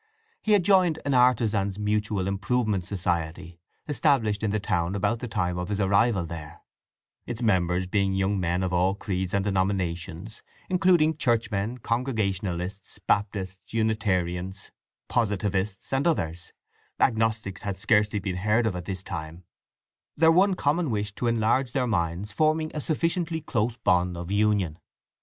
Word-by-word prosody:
He 215 - +2
had 200 -3 +4
joined 185 -5 +4
an 140 - +1
Artizans' 110 -6 +3
Mutual 105 -2 -1
Improvement 100 -1 0
Society 85 -2 -3 0.3
established 135 -9 +1
in 110 - 0
the 105 +1 0
town 95 -2 -1
about 115 +4 0
the 125 - -5
time 90 -4 -1
of 90 +1 -4
his 105 -1 -2
arrival 100 -1 +2
there; 75 -2 -9 0.6
its 120 0 -4
members 90 -4 +2
being 95 +1 0
young 95 +1 +1
men 90 +1 0
of 90 -1 -2
all 90 +2 +2
creeds 95 -3 -3
and 100 0 0
denominations, 95 0 -2 0.3
including 170 -4 +3
Churchmen, 115 -3 0
Congregationalists, 100 -6 -2
Baptists, 100 -1 -2
Unitarians, 95 -4 -1 0.4
Positivists, 100 -2 -1
and 135 +5 +2
others—Agnostics 110 - -2
had 100 -2 -4
scarcely 105 +1 +2
been 95 -2 -3
heard 105 +5 +2
of 105 -5 0
at 90 -1 -5
this 95 -1 -5
time—their 85 - -3
one 190 +3 +4
common 160 0 +1
wish 105 -2 -2
to 120 - -2
enlarge 115 +3 +1
their 130 -3 +1
minds 90 -2 -1
forming 155 +6 +1
a 150 - -3
sufficiently 165 +2 -1
close 120 -5 -1
bond 90 -4 +1
of 85 +2 -6
union. 100 -6 +1
105 Hz, 140 wpm, -26 LUFS, 95-120 Hz, 0.6 s, had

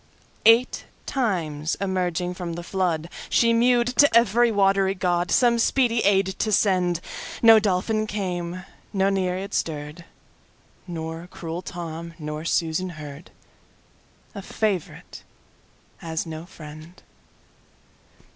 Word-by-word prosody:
Eight 230 +3 +4 0.2
times 170 - -1
emerging 180 -2 -1
from 180 -2 -5
the 175 +1 -6
floodShe 180 +5 0
mew'd 240 +1 +4
to 285 -5 +6
every 235 +1 +4
watery 195 -1 +2
GodSome 185 +7 +2
speedy 240 -1 +2
aid 195 -2 +3
to 215 - 0
send:—No 190 +3 +3
Dolphin 215 +2 0
came, 180 -3 -4 0.3
no 195 -1 +2
Nereid 190 0 -2
stirr'd. 150 +1 -3 0.8
Nor 165 0 -6
cruel 165 0 -6
Tom 170 -2 -7
nor 150 0 -6
Susan 165 +2 0
heard—A 150 +6 -14
favourite 195 -3 -3 0.8
has 160 0 -4
no 160 +1 -7
friend! 155 0 -12
180 Hz, 100 wpm, -24 LUFS, 165-205 Hz, 0.8 s, to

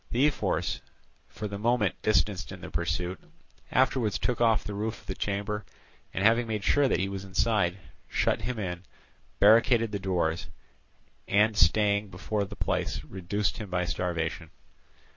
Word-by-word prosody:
The 125 +4 +3
ephors, 150 - 0 0.5
for 105 - -5
the 100 0 -6
moment 115 -2 +2
distanced 100 -2 +1
in - - -9
the - - -8
pursuit, 90 +2 -2 0.5
afterwards 130 -5 +2
took 120 -1 -1
off 115 -2 +4
the 105 - -5
roof 105 +2 -3
of - - -23
the 95 - -3
chamber, 105 +2 -2 0.5
and 95 - -2
having 115 +2 +4
made 105 -2 -2
sure 145 +4 +4
that - - +1
he 95 - 0
was 95 -1 -5
inside, 100 -1 +1 0.3
shut - - +1
him 120 +2 -3
in, 90 -4 -3 0.6
barricaded 115 +1 +5
the 100 - -2
doors, 90 -4 -1 0.8
and 105 +2 +3
staying 100 +3 +3
before 100 +3 -2
the - - -9
place, - - -1
reduced 95 +2 -2
him 105 -3 -6
by 90 -1 0
starvation. 85 -2 -2
100 Hz, 160 wpm, -28 LUFS, 95-110 Hz, 0.8 s, barricaded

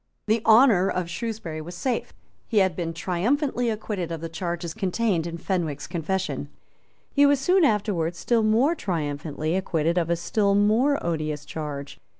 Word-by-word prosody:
The 220 +1 +2
honour 220 -5 +6
of 175 -2 -2
Shrewsbury 175 -6 -4
was 175 +3 -8
safe. 245 +5 -2 0.4
He 225 - -1
had 190 -4 +3
been 170 -1 -2
triumphantly 235 - 0
acquitted 210 -5 -3
of 165 - -3
the 165 +1 -5
charges 170 0 -4
contained 190 -3 0
in 170 0 -5
Fenwick's 165 -5 -2
confession. 165 -4 -3 0.6
He 285 - +4
was 285 -1 +3
soon 360 +6 +3
afterwards 195 - +1
still 235 +4 +1
more 225 +9 +3
triumphantly 155 - -3
acquitted 170 -2 +1
of 170 -1 -2
a 170 - +3
still 200 +4 +1
more 225 +8 +3
odious 155 -3 -2
charge. 145 -3 -6
180 Hz, 155 wpm, -25 LUFS, 165-220 Hz, 0.6 s, honour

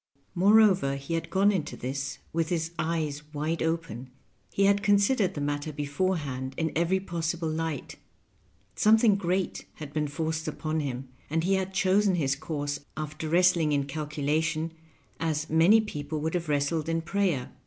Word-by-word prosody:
Moreover, 190 -6 +5
he 140 +4 -5
had 165 0 -2
gone 195 +3 +4
into 170 -7 -3
this 135 +2 -4 0.2
with 165 -1 0
his 165 -1 -1
eyes 155 -3 -1
wide 155 +3 -1
open 160 -7 -2 0.2
— - - -41
he 195 - +2
had 200 0 +4
considered 205 +1 +3
the 145 - -3
matter 145 +1 -2
beforehand 145 -3 -2
in 160 -1 0
every 170 +3 +2
possible 170 -2 -2
light; 160 -2 -3 0.8
something 220 0 +5
great 185 -1 -1
had 150 -2 -9
been 150 -1 0
forced 160 +2 -3
upon 155 0 -2
him, 135 -3 -4 0.2
and 160 +2 0
he 190 +3 +2
had 190 0 0
chosen 190 +1 +3
his 140 -5 +1
course 145 -1 -3 0.2
after 155 +1 -4
wrestling 170 -2 +4
in 140 -1 +2
calculation 155 +2 -1 0.5
as 155 -1 -1
many 170 +8 +6
people 150 -8 -4
would 160 +2 -2
have 170 -3 -2
wrestled 150 +2 0
in 165 0 0
prayer. 170 -7 0
160 Hz, 160 wpm, -28 LUFS, 145-180 Hz, 0.8 s, many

